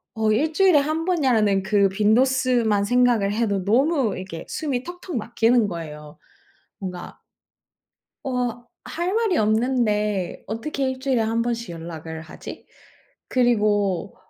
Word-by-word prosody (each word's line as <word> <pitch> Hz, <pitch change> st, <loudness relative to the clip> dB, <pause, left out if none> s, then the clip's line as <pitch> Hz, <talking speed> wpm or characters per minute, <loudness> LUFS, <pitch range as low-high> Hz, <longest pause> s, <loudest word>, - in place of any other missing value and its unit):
어 220 Hz, -1 st, +1 dB
'1 300 Hz, +9 st, +1 dB
주일에 370 Hz, -3 st, +5 dB
1 310 Hz, +3 st, -1 dB
번이야.'라는 230 Hz, -, +2 dB
그 200 Hz, 0 st, +3 dB
빈도수만 230 Hz, +1 st, +2 dB
생각을 240 Hz, -3 st, +2 dB
해도 205 Hz, -4 st, 0 dB
너무 255 Hz, -, +2 dB
이렇게 185 Hz, -3 st, -7 dB
숨이 275 Hz, -6 st, -2 dB
턱턱 355 Hz, +1 st, -8 dB
막히는 230 Hz, 0 st, +2 dB
거예요. 150 Hz, -3 st, -8 dB, 0.6 s
뭔가 180 Hz, -3 st, -7 dB, 1.1 s
어 245 Hz, -2 st, -2 dB, 0.2 s
'할 345 Hz, +3 st, -2 dB
말이 445 Hz, -6 st, +1 dB
없는데 215 Hz, -4 st, 0 dB
어떻게 265 Hz, +5 st, -3 dB
1 260 Hz, 0 st, -6 dB
주일에 260 Hz, -3 st, +1 dB
1 225 Hz, +1 st, 0 dB
번씩 235 Hz, -3 st, -3 dB
연락을 160 Hz, -1 st, -7 dB
하지?' 160 Hz, -, -10 dB, 0.6 s
그리고 210 Hz, -6 st, +1 dB
225 Hz, 250 characters per minute, -23 LUFS, 200-260 Hz, 1.1 s, 주일에